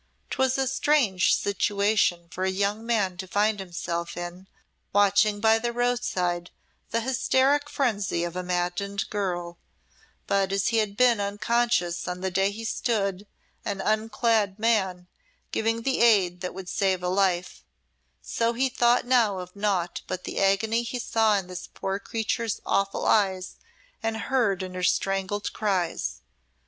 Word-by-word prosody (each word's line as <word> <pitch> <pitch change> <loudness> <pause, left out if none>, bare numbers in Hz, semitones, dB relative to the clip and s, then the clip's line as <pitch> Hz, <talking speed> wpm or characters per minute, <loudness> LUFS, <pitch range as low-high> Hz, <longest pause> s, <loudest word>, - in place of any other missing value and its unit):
'Twas 265 0 +1
a 270 - +1
strange 265 -8 +3
situation 200 -3 +1
for 185 - -4
a 190 - +2
young 200 +3 -1
man 210 -6 0
to 190 +1 -6
find 205 +2 +1
himself 170 -2 -4
in, 175 +2 -7 0.5
watching 205 +1 +4
by 220 +1 +4
the 240 +1 -1
roadside 235 -8 -1 0.4
the 230 - 0
hysteric 265 +3 +2
frenzy 205 -11 0
of 175 0 -4
a 185 - -2
maddened 180 +3 -2
girl; 175 -4 -3 0.7
but 195 -1 +1
as 195 -1 +1
he 230 - +1
had 210 -2 0
been 245 -4 +4
unconscious 205 -3 0
on 180 0 -4
the 190 0 -2
day 195 +2 +2
he 215 +3 -7
stood, 205 -5 -1 0.4
an 205 -3 -3
unclad 215 -1 +1
man, 195 -5 +1 0.5
giving 225 +1 0
the 265 +1 0
aid 190 -7 +4
that 180 -1 -4
would 190 -1 -7
save 190 -1 0
a - - 0
life, 185 -1 0 0.6
so 230 0 0
he 260 +3 +1
thought 240 -1 +3
now 235 -6 +3
of 180 0 -8
naught 195 -4 -1
but 185 0 -4
the - - -4
agony 215 +4 +2
he 235 +1 -4
saw 225 -3 +2
in 195 - -3
this 180 0 -7
poor 195 +1 -4
creature's 225 +1 -2
awful 195 0 0
eyes 190 -3 +1 0.4
and 225 0 -1
heard 225 -6 0
in 185 0 -6
her 185 - -5
strangled 195 +2 0
cries. 190 -5 -1
200 Hz, 155 wpm, -26 LUFS, 185-225 Hz, 0.7 s, watching